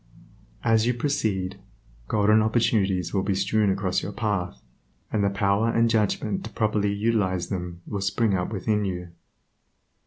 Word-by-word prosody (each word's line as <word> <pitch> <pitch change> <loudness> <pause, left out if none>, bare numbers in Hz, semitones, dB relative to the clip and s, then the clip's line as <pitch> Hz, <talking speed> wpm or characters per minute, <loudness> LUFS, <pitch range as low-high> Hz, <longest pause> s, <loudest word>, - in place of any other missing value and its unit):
As 115 0 +3
you 125 - +1
proceed, 100 -8 -1 0.5
golden 105 +1 +4
opportunities 100 -6 +1
will 95 - +2
be 95 0 0
strewn 105 +2 +2
across 95 -1 0
your 100 - -5
path, 95 - -2 0.5
and 105 - +1
the 100 - +3
power 100 +2 +1
and 115 0 +2
judgment 115 - 0
to - - -6
properly 105 -2 0
utilize 100 -4 0
them 90 -3 -5
will 100 -2 -4
spring 100 +2 +1
up 90 +1 -1
within 105 +1 0
you. 90 -3 -4
100 Hz, 150 wpm, -25 LUFS, 95-110 Hz, 0.5 s, golden